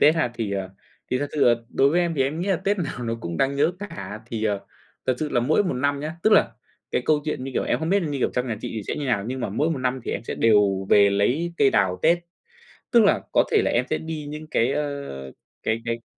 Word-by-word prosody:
Tết 150 +3 +6
ha. 155 -7 +1
Thì, 110 -4 -3
ờ, 95 -1 -3 0.4
thì 125 - +1
thật 145 - -1
sự 150 - +2
là 120 - +6
đối 135 +3 +3
với 175 - +3
em 170 -2 0
thì 135 - +2
em 145 +5 -2
nghĩ 195 - -2
là 190 - +3
Tết 195 +3 -1
nào 145 -7 -3
nó 115 0 -1
cũng 85 -3 -4
đáng 135 +6 +1
nhớ 160 +5 +3
cả. 105 - -7
Thì, 110 -2 -3
ờ, 100 -2 0 0.5
thật 130 - +2
sự 155 - -2
là 120 - +1
mỗi 155 +11 +2
một 180 - -1
năm 140 +2 0
nhá, 155 +3 -4
tức 215 - +4
là, 115 - +5 0.4
cái 125 - 0
câu 150 -1 +3
chuyện 145 -4 -3
như 135 - -5
kiểu - - +1
em - - 0
không 160 +1 -3
biết, 200 0 +3
như 145 -4 -2
kiểu, - - +1
trong 125 +1 0
nhà 115 -3 -2
chị - - -5
thì 110 - -3
sẽ - - -2
như 145 - -3
nào, 105 -6 0
nhưng 130 +1 -4
mà 120 - -2
mỗi 150 +11 0
một 150 - -1
năm 130 0 -1
thì - - -3
em 100 - -3
sẽ - - -4
đều 100 -4 +3
về 100 -1 +6
lấy 130 +13 +1
cây 135 - +4
đào 95 -2 +2
Tết. 170 +1 +4 0.7
Tức 235 - +6
là, 200 - +3
có - - +4
thể - - +4
là - - +1
em 125 +2 +1
sẽ 155 - +1
đi 160 -2 -6
những 155 +1 -7
cái, 130 -4 +1
ơ, 140 - -4 0.3
cái 110 +1 0
cái 115 0 -3
130 Hz, 285 wpm, -24 LUFS, 115-155 Hz, 0.7 s, Tết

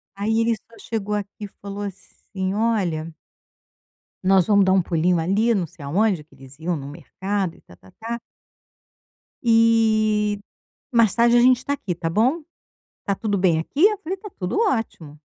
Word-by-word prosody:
Aí, 220 +3 0
ele 230 0 +2
só 230 +2 -20
chegou 210 -2 -3
aqui 205 +1 -5
e - - -7
falou 200 0 -8
assim: 190 -1 -6
"Olha" 190 -8 -1 1.1
"nós 185 -2 +4
vamos 200 -2 +4
dar 190 - +4
um 190 -1 +4
pulinho 170 +1 +1
ali 205 +8 +2
não 185 -5 0
sei 165 -2 -14
aonde.", 185 +3 +1
que 150 - -24
eles 135 0 -15
iam 170 +2 -2
num 140 -2 -7
mercado 190 +3 -4
e - - -21
tá-tá-tá 160 - -9 1.2
"e, 220 -2 +3 0.6
mais 230 -4 +4
tarde, 235 0 +4
a - - +5
gente 255 +1 +6
está 275 +3 -3
aqui, 205 -10 -3
tá 165 0 -3
bom? 245 - +2 0.6
Está 200 - -1
tudo 205 -1 -1
bem 180 -3 +3
aqui?" 280 - +2
Eu 420 -1 +1
falei: 355 +2 -4
"Está 415 +2 -10
tudo 180 - -3
ótimo". 225 - -2
200 Hz, 170 wpm, -22 LUFS, 175-230 Hz, 1.2 s, gente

